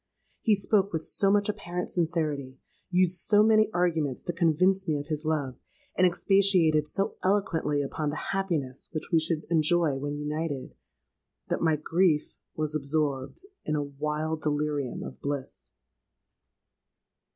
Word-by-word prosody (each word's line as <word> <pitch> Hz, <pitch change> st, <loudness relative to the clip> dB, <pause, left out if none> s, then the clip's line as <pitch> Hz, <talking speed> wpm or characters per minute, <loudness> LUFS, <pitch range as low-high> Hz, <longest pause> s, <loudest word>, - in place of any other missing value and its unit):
He 220 Hz, -3 st, +4 dB
spoke 200 Hz, 0 st, +1 dB
with 160 Hz, -1 st, -2 dB
so 195 Hz, -, +1 dB
much 205 Hz, 0 st, +3 dB
apparent 180 Hz, -4 st, -4 dB
sincerity, 155 Hz, -6 st, -1 dB, 0.3 s
used 180 Hz, -1 st, +2 dB
so 210 Hz, +3 st, +4 dB
many 215 Hz, 0 st, +4 dB
arguments 165 Hz, -7 st, 0 dB
to 175 Hz, -, -3 dB
convince 185 Hz, +3 st, +2 dB
me 155 Hz, -2 st, +1 dB
of 145 Hz, +2 st, -7 dB
his 155 Hz, 0 st, -2 dB
love, 145 Hz, -5 st, -1 dB, 0.4 s
and 185 Hz, -, +5 dB
expatiated 175 Hz, -5 st, +3 dB
so 195 Hz, +5 st, -2 dB
eloquently 165 Hz, -7 st, +1 dB
upon 150 Hz, +2 st, -3 dB
the 150 Hz, -, -4 dB
happiness 160 Hz, -10 st, -2 dB
which 155 Hz, +2 st, -5 dB
we 165 Hz, -, +6 dB
should 160 Hz, 0 st, -1 dB
enjoy 160 Hz, -2 st, +3 dB
when 145 Hz, +1 st, -3 dB
united, 150 Hz, -1 st, -4 dB, 0.8 s
that -, -, -1 dB
my 160 Hz, -2 st, +3 dB
grief 160 Hz, +1 st, +1 dB, 0.2 s
was 155 Hz, -1 st, -1 dB
absorbed 145 Hz, -, -2 dB, 0.2 s
in 155 Hz, -, -1 dB
a 145 Hz, -, 0 dB
wild 150 Hz, +3 st, -3 dB
delirium 145 Hz, -3 st, -1 dB
of -, -, -9 dB
bliss! 140 Hz, -2 st, -4 dB
160 Hz, 140 wpm, -28 LUFS, 150-180 Hz, 0.8 s, we